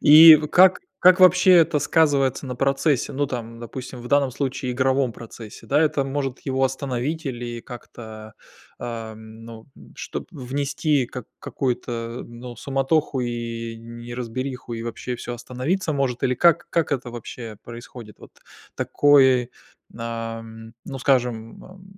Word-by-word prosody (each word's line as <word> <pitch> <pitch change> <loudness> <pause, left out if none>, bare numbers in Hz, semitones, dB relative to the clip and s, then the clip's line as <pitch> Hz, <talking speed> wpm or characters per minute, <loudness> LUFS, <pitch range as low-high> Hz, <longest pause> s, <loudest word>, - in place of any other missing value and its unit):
И 155 +2 +10 0.2
как 185 +1 +6 0.2
как 185 +1 +6
вообще 185 0 +7
это 165 -3 +5
сказывается 145 -3 +2
на 125 -1 -5
процессе? 135 +1 +1
Ну, 145 +1 0
там, 115 -3 -6
допустим, 125 +1 -8
в 120 - -8
данном 140 -1 +2
случае 130 -1 -3
игровом 130 0 +1
процессе, 115 0 -11
да. 145 +2 +2
Это 150 -3 +2
может 135 -1 -3
его 135 -1 0
остановить 135 +4 -2
или 120 -2 -5
как-то, 110 -3 -11 0.5
ам, 110 -1 -8
ну, 115 -1 -11
м, - - -16
чтоб - - -6
внести 140 +1 -1
как 125 -2 -8
какую-то, 120 -2 -3
ну, 120 0 -10
суматоху 135 +2 0
и 115 -1 -4
неразбериху, 120 +2 -6
и 115 -1 -4
вообще 120 +2 -5
всё 120 - -6
остановиться 140 +9 -2
может? 135 -4 -1
Или 130 - +2
как 170 +3 +3
как 165 -3 0
это 125 -3 -3
вообще 115 -2 -8
происходит? 115 -2 -11
Вот - - -15 0.4
такое, 130 -4 +4 0.5
ам, 115 -1 -6
ну, 135 - -6
скажем, 120 -4 0
ам, 185 0 -15
125 Hz, 140 wpm, -23 LUFS, 115-140 Hz, 0.5 s, И